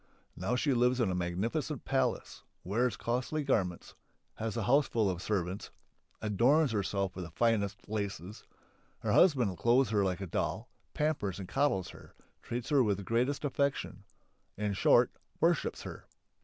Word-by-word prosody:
Now 95 +8 -1
she 135 +2 +1
lives 125 +1 +2
in 110 -6 +2
a - - -1
magnificent 100 - -2
palace, 130 -3 -1 0.2
wears 120 +6 0
costly 125 +6 -1
garments, 95 -11 -1 0.4
has 115 +1 -3
a 115 - -1
houseful 115 -4 +3
of 90 -1 -5
servants, 95 -1 -2 0.5
adorns 125 +8 +3
herself 100 -2 -1
with 90 - -5
the 85 - -7
finest 105 +2 0
laces; 100 -2 -4 0.6
her - - -1
husband 125 - +4
clothes 120 +2 +3
her 105 -2 +3
like 95 -1 -1
a - - -2
doll, 85 - -2 0.3
pampers 150 - -1
and 95 -2 -6
coddles 135 -9 +1
her, - - -14 0.3
treats 120 0 -5
her 145 -3 +4
with 105 -5 +2
the 100 - -7
greatest 125 +8 0
affection 140 -6 -1 0.5
in 105 0 -1
short, 120 +4 +4 0.3
worships 170 -1 +1
her. - - -9
115 Hz, 155 wpm, -31 LUFS, 95-130 Hz, 0.6 s, husband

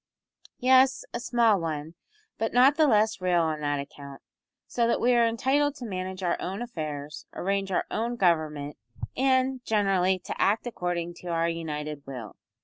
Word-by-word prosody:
"Yes, 260 +1 +4
a 240 - -2
small 230 -5 +2
one, 155 -1 -4 0.5
but 225 - -1
not 260 +4 +6
the 310 -1 +4
less 220 -3 +2
real 180 -2 +2
on 155 -1 -2
that 145 -1 0
account, 140 -1 -9 0.5
so 235 -1 0
that 235 - +1
we 250 +1 +3
are 235 -1 +4
entitled 275 +5 +1
to 255 - -8
manage 185 -2 -5
our 175 -1 0
own 195 +6 -3
affairs, 150 - -6
arrange 195 +1 -1
our - - 0
own 235 +2 -1
government, 155 - 0 0.4
and, 260 -1 +1
generally, 195 -4 +2
to - - -4
act 210 +5 +2
according 175 -6 -3
to 180 - -10
our 165 -1 +1
united 150 -3 -4
will. 125 -6 -7
190 Hz, 165 wpm, -27 LUFS, 155-240 Hz, 0.5 s, not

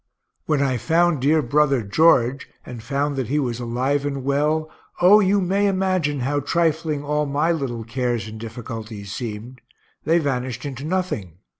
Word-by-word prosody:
When 150 -3 +2
I 130 -2 0
found 170 +3 +2
dear 150 +3 +3
brother 140 -1 +2
George, 135 +2 +3 0.2
and 120 -3 -8
found 140 +4 -1
that 130 -4 -2
he 145 - 0
was 125 -5 -1
alive 130 +4 -1
and 140 -2 -3
well, 150 +3 +1 0.3
O 190 +4 +7
you 200 0 +3
may 195 +2 +1
imagine 185 -7 0
how 145 +3 0
trifling 160 0 0
all 150 0 0
my 145 +4 +1
little 130 -8 -3
cares 120 -1 -2
and 110 0 -8
difficulties 110 -3 -7
seemed 120 +3 -6 0.4
they 165 +2 +3
vanished 130 -5 -2
into 135 0 -6
nothing. 155 - -3
140 Hz, 160 wpm, -22 LUFS, 120-155 Hz, 0.4 s, O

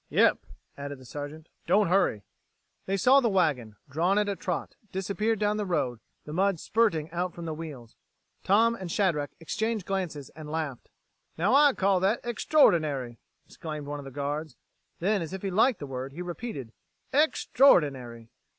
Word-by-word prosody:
"Yep," - - +4 0.4
added 140 0 -5
the 130 - -15
Sergeant, 145 +4 -7 0.2
"don't 200 +4 +4
hurry." 180 - +2 0.6
They 195 +1 0
saw 260 +8 +6
the 240 -4 +2
wagon, 145 - +1
drawn 170 +8 +1
at 210 0 +2
a 200 - -1
trot, 180 -2 -4 0.2
disappear 200 +4 -1
down 210 0 0
the 210 - -1
road, 125 -9 -1 0.3
the 150 - -7
mud 195 0 +1
spurting 165 -9 +1
out 175 +1 -2
from 170 - -7
the 160 - -3
wheels. 145 -8 -9 0.5
Tom 225 +4 +4
and 190 -6 -6
Shadrack 160 -8 +1
exchanged 220 +4 -2
glances 175 -8 -3
and 155 -1 -10
laughed. 155 -5 -4 0.5
"Now 180 +9 +2
I 285 0 +6
call 195 -3 +2
that 195 +5 +2
extraordinary!" 155 - +2 0.3
exclaimed 155 -3 -7
one 145 0 -5
of 140 - -9
the - - -7
guards. 145 +1 -4 0.4
Then, 200 +3 +1
as 165 +2 -5
if 190 - -6
he 195 - -2
liked 225 +6 +3
the 145 - -6
word, 135 0 -6
he 175 +4 -5
repeated, 175 - -6 0.4
"Extraordinary!" 145 - +3
170 Hz, 170 wpm, -28 LUFS, 145-200 Hz, 0.6 s, saw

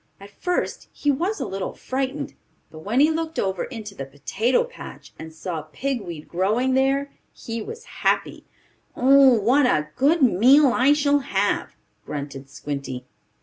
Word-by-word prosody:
At 200 +1 -13
first 360 - -2
he 290 - 0
was 360 +10 -1
a - - -2
little 195 0 -4
frightened, 270 +2 -3 0.4
but 155 - -10
when 210 +10 -1
he 300 +3 +5
looked 320 0 -3
over 190 -2 -1
into 220 -5 -8
the 140 - -6
potato 190 - 0
patch, - - -11
and 160 - -8
saw 160 0 -5
pig 270 - -2
weed 170 -5 -8
growing 215 +9 +1
there 275 +2 +1 0.2
he 230 0 -6
was 460 - -8
happy. - - -1 0.5
"Oh, 265 -2 +6
what 250 +6 +3
a 150 -9 +1
good 295 +3 +3
meal 255 +5 +5
I 265 +4 +4
shall 290 -1 +2
have!" 205 -7 -1 0.3
grunted 140 -1 -6
Squinty. 140 -3 -6
245 Hz, 155 wpm, -23 LUFS, 185-280 Hz, 0.5 s, Oh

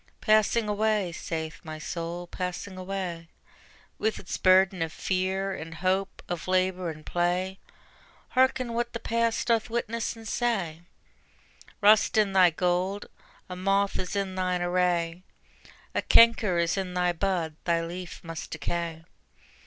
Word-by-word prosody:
Passing 215 +1 +3
away, 210 -3 +1
saith 160 -1 -5
my 155 -2 -7
Soul, 170 +2 -5
passing 180 +2 -5
away: 185 -3 -4 0.7
With 220 - 0
its 180 - -5
burden 185 0 +4
of 165 -1 -1
fear 190 +2 -1
and 165 -3 -7
hope, 190 +2 -1
of 175 -1 -4
labor 185 -1 +1
and 155 -1 -9
play; 180 +2 0 0.7
Hearken 255 -2 +2
what 235 0 -2
the 230 - -3
past 230 0 0
doth 230 -1 +2
witness 230 0 -2
and 225 -1 -10
say: 195 -10 -1 1.0
Rust 215 +1 +5
in 205 -3 +3
thy 185 -2 +7
gold, 180 +4 0 0.4
a 180 - -6
moth 195 +2 +1
is 185 +2 -4
in 195 -1 -1
thine 180 -1 0
array, 175 -1 +1 0.7
A - - +1
canker 230 -5 +5
is 170 +2 +1
in 185 -2 -3
thy 180 -1 +2
bud, 170 -3 -1
thy 170 -1 +2
leaf 175 +1 -7
must 165 -1 -6
decay. 170 -2 -3
185 Hz, 140 wpm, -27 LUFS, 175-205 Hz, 1.0 s, thy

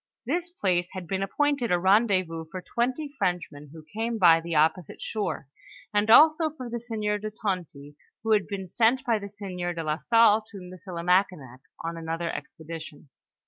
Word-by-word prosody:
This 350 0 -1
place 180 - 0
had 185 -2 -6
been 190 +3 -2
ap 195 - -2
pointed 285 -6 +1
a 180 - +4
rendezvous 185 -4 +2
for 185 - -6
twenty 260 - -2
Frenchmen, 170 -6 -2
who 160 -1 -12
came 225 +2 -2
by 165 -5 +6
the 170 0 -4
opposite 160 +2 +1
shore, 205 -10 -3 0.5
and 205 +1 +2
also 310 +6 +7
for 260 -6 -9
the 235 - -3
sieur 215 -3 -2
de 215 +1 -4
Tonty, 175 -9 -5 0.3
who 225 - -1
had 210 -2 +3
been 195 -2 -5
sent 235 +8 +2
by 230 -4 +2
the 200 0 -7
sieur 185 -4 -5
do 165 - -3
la 155 +1 -1
Salle 225 -2 +4
to 210 - -10
Miesilimakinak 180 -6 -1 0.3
on 165 0 -4
another 165 +1 -3
expedition. 160 -2 -9
190 Hz, 175 wpm, -26 LUFS, 170-225 Hz, 0.5 s, also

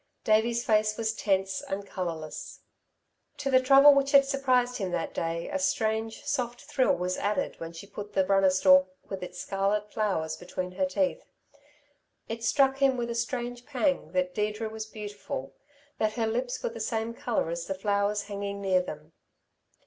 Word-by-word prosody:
Davey's 230 +2 +2
face 215 -1 +2
was 225 -1 0
tense 195 -3 0
and 200 +1 -5
colourless. 165 -5 -5 0.8
To 275 -1 -2
the 260 - +7
trouble 275 +2 +8
which 275 0 +1
had 275 -1 +8
surprised 255 -3 +1
him 195 -4 -2
that 170 -2 -2
day, 165 0 -2
a - - -2
strange 220 +5 -1
soft 250 -4 -2
thrill 280 -3 +1
was 180 +1 -2
added 210 +7 -1
when 165 0 -6
she 165 +3 -10
put 205 +1 -8
the 190 -1 +2
runner 195 0 +4
stalk 185 0 +5 0.2
with 195 -2 -5
its 180 0 -7
scarlet 205 +2 -1
flowers 175 -8 -1
between 180 0 -5
her 185 0 0
teeth. 280 - 0 1.1
It 230 0 -5
struck 270 +3 +3
him 270 -2 +3
with 235 -1 -2
a - - -1
strange 240 +1 -3
pang 280 0 0
that 275 0 0
Deirdre 210 +1 -2
was 220 0 -6
beautiful, 205 -10 -6 0.5
that 215 0 +1
her 230 -2 0
lips 245 +3 -2
were - - 0
the 230 - -9
same 225 +1 -2
colour 230 -8 -1
as 170 0 -4
the 195 - -2
flowers 200 +1 0
hanging 200 0 -5
near 190 -2 +2
them. 155 -2 -9
215 Hz, 175 wpm, -28 LUFS, 190-245 Hz, 1.1 s, trouble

